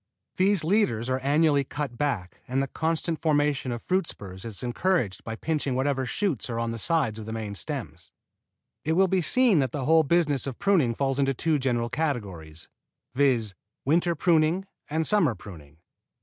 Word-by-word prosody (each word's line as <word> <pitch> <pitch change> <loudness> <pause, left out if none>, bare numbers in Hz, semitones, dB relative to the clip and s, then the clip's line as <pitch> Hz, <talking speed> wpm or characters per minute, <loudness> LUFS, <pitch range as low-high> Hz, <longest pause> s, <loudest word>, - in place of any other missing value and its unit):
These 190 -2 +3
leaders 155 - +1
are 130 - +1
annually 145 +1 +3
cut 140 -2 -5
back 120 -10 -3
and 130 +2 0
the 135 - +1
constant 160 +2 -2
formation 145 -4 +1
of 120 -1 -5
fruit 185 -2 0
spurs 95 -1 -7
is 110 -3 -7
encouraged 125 - 0
by 115 - -5
pinching 145 -1 -2
whatever 135 0 0
shoots 150 - -1
are 115 - -3
on 115 0 -1
the 115 - -5
sides 140 -8 0
of 110 - -8
the - - -5
main 110 -2 -4
stems. 90 - -5 0.7
It 160 - 0
will 190 +3 +4
be 185 0 +1
seen 240 -1 +4
that 130 -4 0
the 135 -2 -3
whole 160 +2 +5
business 150 -3 +2
of 130 - -5
pruning 170 -13 +2
falls 135 +1 -1
into 135 -1 +1
two 155 +3 +1
general 120 -3 0
categories, 100 - -4 0.5
viz., 125 -6 +2 0.3
winter 170 +4 +2
pruning 165 +3 +2 0.2
and 160 +2 0
summer 170 - +2
pruning. 80 -7 -12
140 Hz, 175 wpm, -26 LUFS, 115-160 Hz, 0.7 s, whole